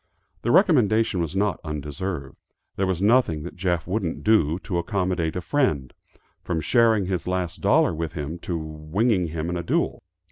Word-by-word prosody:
The 120 - -2
recommendation 115 - +4
was 80 +1 -3
not 100 -2 +1
undeserved. 75 0 -5 0.4
There 95 - 0
was 95 0 -1
nothing 105 -9 +3
that 90 - -8
Jeff 90 -2 -1
wouldn't 95 -3 -2
do, 85 -8 +3
to 90 -3 -1
accommodate 90 -2 -1
a 90 - -2
friend, 85 - 0 0.5
from 85 - -2
sharing 110 +4 +3
his 90 -2 -3
last 90 0 -2
dollar 140 - +3
with 80 0 -4
him, 75 +2 -5
to 85 0 -3
winging 80 +6 0
him 80 0 -4
in 90 0 -2
a - - -2
duel. 85 - -1
90 Hz, 170 wpm, -24 LUFS, 80-105 Hz, 0.5 s, recommendation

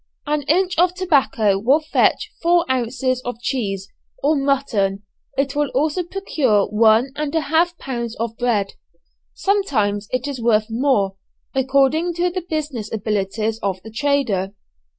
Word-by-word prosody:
An 300 0 0
inch 360 +4 +2
of 360 +1 +3
tobacco 270 - +2
will 260 +9 +4
fetch 310 0 +1
four 345 0 +3
ounces 255 +1 -1
of 245 -2 -5
cheese, 200 -7 -2 0.4
or 300 +3 +3
mutton, 255 -9 0 0.3
it 275 +1 0
will 295 -1 +1
also 305 +6 +1
procure 310 - +1
one 220 +4 +4
and 300 +1 -3
a 320 - +3
half 330 +4 +1
pounds 235 -5 -4
of 230 0 -3
bread. 225 -5 0 0.6
Sometimes 215 - 0
it 255 +2 -2
is 275 -4 -5
worth 220 -2 +3
more, 225 -6 +1 0.4
according 275 +6 +2
to 350 +1 +1
the 370 +1 -3
business 295 -10 -4
abilities 215 +1 -1
of 195 -3 -2
the 220 - -10
trader. 225 -7 0
260 Hz, 145 wpm, -20 LUFS, 215-305 Hz, 0.6 s, will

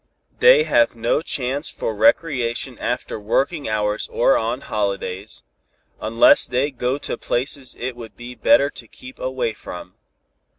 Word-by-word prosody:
They 485 -1 +7
have 120 - +2
no 115 +6 0
chance 140 -1 -2
for 110 - -4
recreation 125 +1 +1
after 120 -2 -3
working 135 +7 -1
hours 105 0 -1
or 125 - +3
on 115 +4 -1
holidays, 100 -2 -3 0.6
unless 115 +2 +5
they 130 +4 0
go 125 +1 -1
to - - -5
places 130 +1 -3
it 125 0 -4
would 115 -3 -11
be 120 +1 -8
better 140 +3 +3
to 115 - -10
keep 130 +4 -13
away 130 -3 -2
from. 90 -2 -10
120 Hz, 140 wpm, -21 LUFS, 110-135 Hz, 0.6 s, They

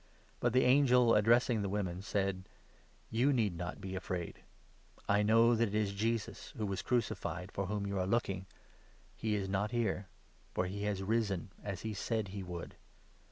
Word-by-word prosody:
But 120 -1 +1
the 130 - +5
angel, 125 -3 +5
addressing 115 +1 +4
the 100 - -1
5 - - -4
women, 95 -3 -2
said: 95 -2 -2 0.3
" - - -32
You 135 +4 +5
need 110 -9 +1
not 90 +1 -5
be 95 -1 -6
afraid. 90 -2 -4 0.7
I 100 +1 +4
know 115 +3 +5
that 115 0 +3
it 105 - -4
is 105 -2 +1
Jesus, 110 +1 -2
who 110 - -1
was 100 -2 -2
crucified, 105 -5 -1
for 100 -1 -2
whom 105 0 -2
you 100 -1 -2
are 90 - 0
looking. 95 -3 0 0.7
He 110 -1 -1
is 100 -2 -1
not 100 +2 0
here; 105 -4 -1 0.5
for 90 - +1
he 95 +3 -4
6 105 - -1
has 100 -2 -1
risen, 100 -4 0
as 100 -3 -4
he 110 -1 -3
said 110 0 -2
he 100 +1 -5
would. 90 -2 -6
100 Hz, 190 wpm, -34 LUFS, 95-115 Hz, 0.7 s, the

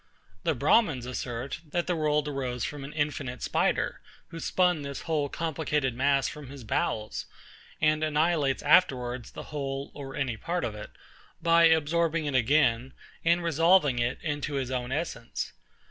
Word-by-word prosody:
The 155 - 0
BRAHMINS 145 - +3
assert, 125 +2 -4
that 175 +3 -1
the 180 - 0
world 150 -1 +1
arose 130 -4 -3
from 145 -2 -4
an 140 - -7
infinite 145 -4 -2
spider, - - 0 0.3
who 165 - -7
spun 180 -1 +2
this 140 -1 -5
whole 150 -3 0
complicated 150 -5 -1
mass 135 +2 +2
from 150 -2 -8
his 135 -1 -10
bowels, 105 0 -2 0.5
and 155 0 +2
annihilates 155 -2 +1
afterwards 125 -7 +3
the - - -9
whole 135 -1 -3
or 135 -2 -8
any 130 -5 -1
part 175 +10 -2
of 110 - -3
it, 105 - -8 0.5
by 170 0 +5
absorbing 160 0 +2
it 145 - -2
again, 130 -1 +3 0.3
and 170 +1 +3
resolving 165 -4 +4
it 120 +1 0
into 145 -1 -2
his 130 -2 -2
own 125 -1 -2
essence. 140 -5 -3
145 Hz, 155 wpm, -28 LUFS, 130-160 Hz, 0.5 s, by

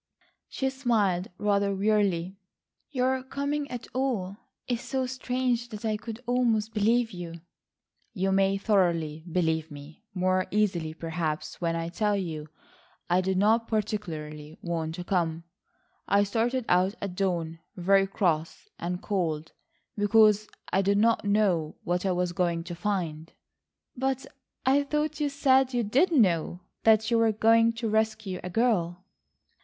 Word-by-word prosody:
She 265 -1 -1
smiled 215 -9 +1
rather 200 -1 +1
wearily, 195 -3 +1 0.5
"Your 260 -1 0
coming 280 +2 -3
at 245 -2 -6
all 235 -8 -1 0.3
is 245 -1 -1
so 265 -1 -2
strange 250 -1 -1
that 215 -1 -7
I 215 -1 +1
could 225 +2 -7
almost 230 -3 +1
believe 225 +2 +2
you." 170 -2 -8 0.7
"You 195 -3 -1
may 195 0 +3
thoroughly 170 -7 +1
believe 160 -2 0
me, 150 +6 -12
more 185 0 +1
easily 180 -7 0
perhaps 165 -1 -4
when 165 -1 0
I 165 0 -2
tell 210 +3 0
you 160 -5 -4 0.6
I 180 +1 +4
did 190 0 0
not 225 +4 +3
particularly 160 -8 -4
want 165 -2 -2
to 180 - -5
come. 170 -3 -1 0.6
I 200 0 +4
started 230 +4 0
out 185 +3 +3
at 200 -3 -4
dawn 170 -4 -1 0.2
very 195 +2 +3
cross 165 -5 -1
and 180 +1 -4
cold 165 -6 -2 0.4
because 215 0 +4 0.3
I 190 - +4
did 200 +1 +2
not 225 0 +3
know 195 -7 +1
what 180 +2 -1
I - - +2
was 180 0 0
going 170 -1 0
to 175 0 -7
find...." 170 -4 -3 0.6
"But 265 +1 -1 0.4
I 270 +2 +4
thought 300 +1 -1
you 295 -1 +1
said 265 -2 +3
you 240 - +2
did 270 - +2
know 180 - +2 0.2
that 220 +1 +4
you 230 - +4
were 225 -1 +4
going 225 +2 +4
to 230 0 -3
rescue 220 -3 0
a 180 - -4
girl?" 185 -5 0
200 Hz, 145 wpm, -27 LUFS, 175-230 Hz, 0.7 s, I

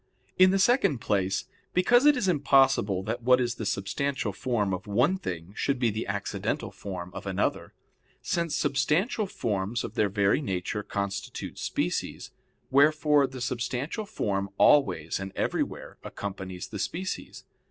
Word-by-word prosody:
In 185 0 +8
the 195 - +2
second 195 - +3
place, 95 -3 0 0.3
because 245 +9 +5
it 295 -2 +6
is 205 - 0
impossible 135 - +3
that 115 +4 -3
what 125 +2 +5
is 120 -2 0
the 110 -3 -4
substantial 135 +9 -2
form 110 -7 -1
of 95 - -5
one 125 - +2
thing 90 - -6
should 140 -1 0
be 120 -3 +1
the 110 +2 -4
accidental 100 0 -2
form 90 -3 -7
of 100 +3 -7
another; 95 -1 -1 0.4
since 170 -3 -1
substantial 155 - +1
forms 110 - -2
of - - -6
their 105 - +1
very 100 +6 +2
nature 95 -3 -2
constitute 100 -1 -4
species: - - -2 0.4
wherefore 150 0 +4
the 130 -1 -9
substantial 125 - -3
form 100 - -2
always 85 - +3
and 95 0 -5
everywhere - - -3
accompanies 95 -2 -6
the 105 - -6
species. 185 - -4
120 Hz, 145 wpm, -27 LUFS, 100-150 Hz, 0.4 s, In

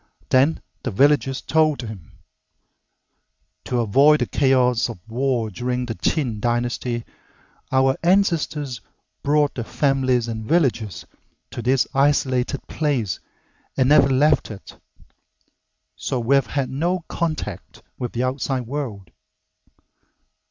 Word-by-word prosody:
Then 135 +5 +3 0.2
the - - -3
villagers 135 +4 +2
told 155 -4 +2
him, 105 -9 -9 1.5
"To 125 -1 0
avoid 140 +8 +4
the - - +2
chaos 125 -3 +2
of 115 - -7
war 120 -2 -1
during 125 +4 -2
the 115 - -4
Qin 120 -3 -1
Dynasty, 120 +1 -1 0.7
our 130 0 +3
ancestors 165 - +1 0.4
brought 145 0 +2
their 120 - -4
families 130 -2 +1
and 110 -1 -4
villagers 115 - 0 0.5
to - - -5
this 130 +2 +2
isolated 135 -2 +1
place 130 - -1 0.6
and 130 0 +3
never 140 -2 +6
left 145 +4 +3
it, 105 -3 -10 1.2
so 130 - -3
we've 135 +4 +2
had 135 -3 -2
no 170 +7 -1
contact 155 - -4 0.2
with 125 -2 -4
the 120 - -1
outside 130 0 -2
world." 115 - -5
130 Hz, 115 wpm, -22 LUFS, 120-145 Hz, 1.5 s, never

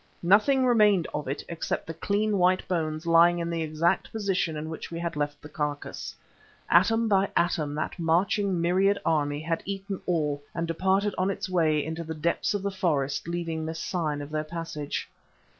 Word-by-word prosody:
Nothing 220 +9 +4
remained 210 -8 +4
of 150 -2 -3
it 135 +2 -3
except 170 -1 -3
the 165 - -5
clean, 205 +4 0
white 185 +1 +3
bones 155 -2 -2
lying 170 +1 +5
in 170 0 -2
the 165 -1 -1
exact 160 +4 0
position 190 -7 -1
in 150 +1 -4
which 160 0 -6
we 165 - -5
had 170 -1 -3
left 145 0 -2
the - - -8
carcase. 150 -1 -4 0.6
Atom 225 +6 +4
by 195 -2 +3
atom 160 -4 +1
that 155 +3 -3
marching 180 +3 +1
myriad 190 +4 +3
army 145 -2 +1
had 165 +1 -2
eaten 195 0 -5
all 150 -5 0
and 165 0 -1
departed 190 +4 +1
on 185 +1 +2
its 195 +1 -3
way 160 -5 +2
into 160 +2 -4
the 160 0 -5
depths 170 +6 0
of 200 - -2
the 200 - -1
forest, 150 -7 -1
leaving 165 -2 -3
this 160 +1 -4
sign 155 -5 -2
of 145 - -10
their 155 0 -1
passage. 155 -2 -5
170 Hz, 185 wpm, -27 LUFS, 155-190 Hz, 0.6 s, lying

